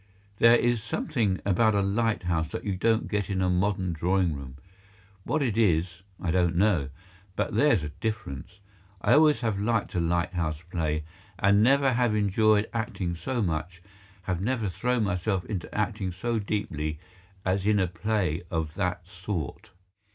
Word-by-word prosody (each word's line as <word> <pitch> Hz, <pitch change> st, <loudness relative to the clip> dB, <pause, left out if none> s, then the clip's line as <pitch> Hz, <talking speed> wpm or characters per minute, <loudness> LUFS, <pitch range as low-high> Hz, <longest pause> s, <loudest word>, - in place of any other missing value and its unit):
There 115 Hz, +1 st, +7 dB
is 120 Hz, -1 st, +2 dB
something 115 Hz, -, -1 dB
about 110 Hz, +2 st, +3 dB
a 100 Hz, -, +3 dB
lighthouse 100 Hz, -6 st, 0 dB
that -, -, -4 dB
you 100 Hz, -2 st, -1 dB
don't 110 Hz, +4 st, +1 dB
get 105 Hz, -2 st, -2 dB
in 95 Hz, -2 st, -1 dB
a 90 Hz, -1 st, +2 dB
modern 95 Hz, -1 st, 0 dB
drawing 90 Hz, +1 st, +1 dB
room. 70 Hz, -2 st, -8 dB, 0.7 s
What 145 Hz, +4 st, 0 dB
it 115 Hz, -4 st, 0 dB
is, 85 Hz, -4 st, +1 dB, 0.2 s
I 85 Hz, -, -1 dB
don't 85 Hz, -1 st, +2 dB
know; 90 Hz, -7 st, +2 dB, 0.5 s
but -, -, -1 dB
there's 115 Hz, -, +3 dB
a 75 Hz, -, -4 dB
difference. 110 Hz, -6 st, -5 dB, 0.4 s
I -, -, +3 dB
always 150 Hz, -2 st, +5 dB
have 110 Hz, -5 st, -1 dB
liked 110 Hz, +1 st, 0 dB
a 90 Hz, -, 0 dB
lighthouse 85 Hz, -2 st, 0 dB
play, 80 Hz, -3 st, -1 dB, 0.3 s
and 100 Hz, +1 st, +4 dB
never 135 Hz, +3 st, +4 dB
have 120 Hz, -3 st, +2 dB
enjoyed 105 Hz, +1 st, +3 dB
acting 105 Hz, -7 st, -2 dB
so 120 Hz, +8 st, -2 dB
much, 85 Hz, +1 st, -3 dB, 0.4 s
have 90 Hz, -1 st, -2 dB
never 115 Hz, -1 st, 0 dB
thrown 125 Hz, +4 st, 0 dB
myself 95 Hz, -1 st, -1 dB
into 95 Hz, -6 st, -4 dB
acting 105 Hz, -3 st, -1 dB
so 115 Hz, +6 st, -2 dB
deeply, 75 Hz, -8 st, -3 dB, 0.5 s
as 95 Hz, +1 st, 0 dB
in 105 Hz, -1 st, +4 dB
a 95 Hz, -, +3 dB
play 90 Hz, -2 st, -1 dB
of 80 Hz, -4 st, -2 dB
that 90 Hz, +1 st, -2 dB
sort. 90 Hz, -5 st, -5 dB
100 Hz, 160 wpm, -27 LUFS, 85-110 Hz, 0.7 s, There